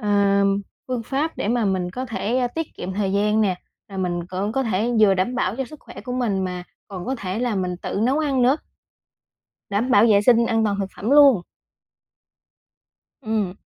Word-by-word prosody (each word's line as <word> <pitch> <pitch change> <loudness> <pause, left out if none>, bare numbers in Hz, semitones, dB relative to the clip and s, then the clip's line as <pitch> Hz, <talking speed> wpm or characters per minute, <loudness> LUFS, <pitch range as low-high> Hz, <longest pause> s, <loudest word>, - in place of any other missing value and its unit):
ờ, 200 -2 +2 0.4
phương 250 -2 -2
pháp 285 +7 -2
để 205 - -2
mà 235 -1 +1
mình 185 -2 -1
có 255 +6 -5
thể, 230 +1 -2
a, 250 - +1
tiết 325 +4 -5
kiệm 185 +1 -5
thời 195 -1 -1
gian 210 +2 +2
nè, 185 -4 0 0.3
rồi 195 -1 -7
mình 175 -2 -2
cũng 195 +4 -3
có 270 - 0
thể 220 +1 0
vừa 200 -3 +6
đảm 190 +7 -1
bảo 225 -3 -1
cho 265 - -2
sức 300 +5 -13
khỏe - - -11
của 250 - -6
mình 215 -7 0
mà 180 -1 -4 0.3
còn 185 -3 -7
có 265 - -1
thể 190 -2 -4
là 245 -2 -1
mình 180 -2 -2
tự 195 - -4
nấu 265 +5 +2
ăn 275 -5 +1
nữa. 260 +4 +4 1.1
Đảm 225 +6 0
bảo 225 -4 +6
vệ 200 -1 +5
sinh 235 +1 +4
an 225 -1 +1
toàn 200 -1 0
thực 195 - -1
phẩm 215 +6 -3
luôn. 280 -9 +6 1.8
Ừm. 210 -4 -2
210 Hz, 205 wpm, -22 LUFS, 190-250 Hz, 1.8 s, vừa